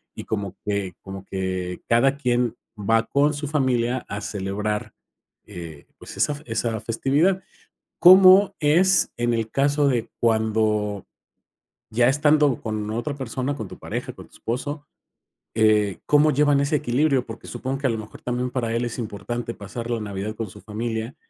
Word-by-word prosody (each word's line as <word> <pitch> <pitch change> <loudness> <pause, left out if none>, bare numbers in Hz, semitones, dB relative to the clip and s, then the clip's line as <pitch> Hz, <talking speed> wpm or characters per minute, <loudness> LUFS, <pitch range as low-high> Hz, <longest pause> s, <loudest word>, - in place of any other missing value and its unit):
Y - - -7
como 100 -3 -3
que 100 -3 -2
como 95 0 -9
que 95 -2 -3
cada 135 +4 +3
quien 125 -3 0 0.2
va 115 +2 +2
con 145 +4 +2
su 145 0 -4
familia 130 -4 0
a 100 +1 -5
celebrar, 105 +1 -3 0.5
eh, 85 -7 -9
pues, - - -10
esa 150 - +2
fe 145 - -11
esa 115 -1 -1
festividad, 145 - +1 0.6
¿cómo 185 +2 +8
es 175 +6 +3
en 120 0 +1
el 115 -1 -1
caso 145 +1 +2
de 120 -4 0
cuando, 110 -3 +1 0.9
ya 120 +2 +3
estando 145 -1 +3
con 110 -1 -3
otra 120 +7 -3
persona, 130 +1 -3
con 110 -8 -6
tu - - -11
pareja, - - -5
con - - -13
tu - - -28
esposo? 145 +5 -4 0.7
Eh, 105 -4 +3
¿cómo 150 +1 +4
llevan 145 0 +3
ese 140 +2 +1
equilibrio? 135 0 +1
Porque, 115 0 -10
supongo 130 +2 -4
que 140 - +1
a - - +1
lo 115 - -1
mejor 110 0 -10
también, 125 0 -2
para 115 -3 -2
él 120 +1 0
es 120 - -5
importante 115 +2 -4
pasar 115 +4 -7
la 115 - 0
Navidad 105 0 -4
con 115 0 -4
su 105 +2 -13
familia, 110 +3 -4
120 Hz, 165 wpm, -23 LUFS, 105-140 Hz, 0.9 s, cómo